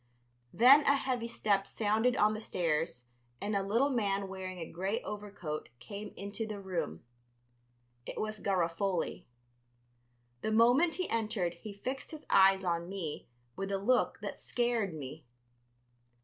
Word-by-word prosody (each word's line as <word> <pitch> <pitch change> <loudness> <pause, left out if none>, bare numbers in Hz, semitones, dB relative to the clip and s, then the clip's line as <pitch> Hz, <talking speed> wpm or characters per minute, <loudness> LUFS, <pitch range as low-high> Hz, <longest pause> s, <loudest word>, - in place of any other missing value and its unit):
Then 260 +5 +8
a 280 - +6
heavy 255 -4 -1
step 200 -4 +1
sounded 220 +3 +1
on 215 -2 +4
the 215 - -5
stairs 165 - -1 0.3
and 205 0 -2
a 200 - +2
little 230 +9 +2
man 200 -5 0
wearing 190 -1 -6
a 165 - -4
gray 190 +7 -2
overcoat 200 -7 -5
came 200 - -7
into 200 +3 -4
the 210 -2 -5
room. 180 - -3 1.0
It - - -5
was 215 0 -3
Garofoli. 180 -1 -1 1.1
The 220 - -1
moment 245 +9 +5
he 370 - -2
entered 215 -6 -1
he 205 +5 -9
fixed 265 +1 -3
his 310 -1 -9
eyes 195 0 +6
on 170 -1 -1
me 180 -6 -5 0.3
with 195 +1 -3
a 195 - +1
look 245 +6 +2
that - - -6
scared 235 -7 0
me. 150 +1 -7
200 Hz, 145 wpm, -32 LUFS, 180-230 Hz, 1.1 s, Then